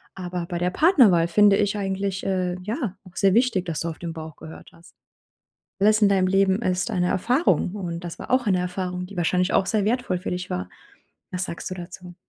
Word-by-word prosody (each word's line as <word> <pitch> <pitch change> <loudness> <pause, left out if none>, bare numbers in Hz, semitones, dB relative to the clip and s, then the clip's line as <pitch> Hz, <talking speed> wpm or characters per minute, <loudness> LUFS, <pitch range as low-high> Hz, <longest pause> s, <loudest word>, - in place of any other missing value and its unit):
Aber 180 -2 -4
bei 175 -2 -3
der 180 +1 0
Partnerwahl 225 - +5
finde 200 +3 +5
ich 205 0 0
eigentlich, 195 -1 -2
äh, 185 -2 -1
ja, 215 - -3
auch 185 -1 -17
sehr 195 -1 +3
wichtig, 230 -6 +2
dass 165 -4 -3
du 170 - -2
auf 160 - -8
den 170 -1 -5
Bauch 160 -1 -8
gehört 160 0 -11
hast. 165 0 -19 0.9
Alles 215 +2 +4
in 205 - +5
deinem 190 -2 +2
Leben 195 +2 +2
ist 185 +3 0
eine 180 -4 0
Erfahrung. 240 - +1
Und 175 -3 -5
das 170 - -7
war - - -9
auch 255 -2 +2
eine 185 -3 +2
Erfahrung, 180 0 -3
die 200 - -12
wahrscheinlich 180 +2 +1
auch 190 - +2
sehr 210 -1 +1
wertvoll 230 -5 0
für - - -5
dich 180 0 -4
war. 90 0 -4 0.6
Was 180 0 -2
sagst 170 - -6
du - - -3
dazu? 180 0 -10
185 Hz, 215 wpm, -24 LUFS, 175-200 Hz, 0.9 s, Partnerwahl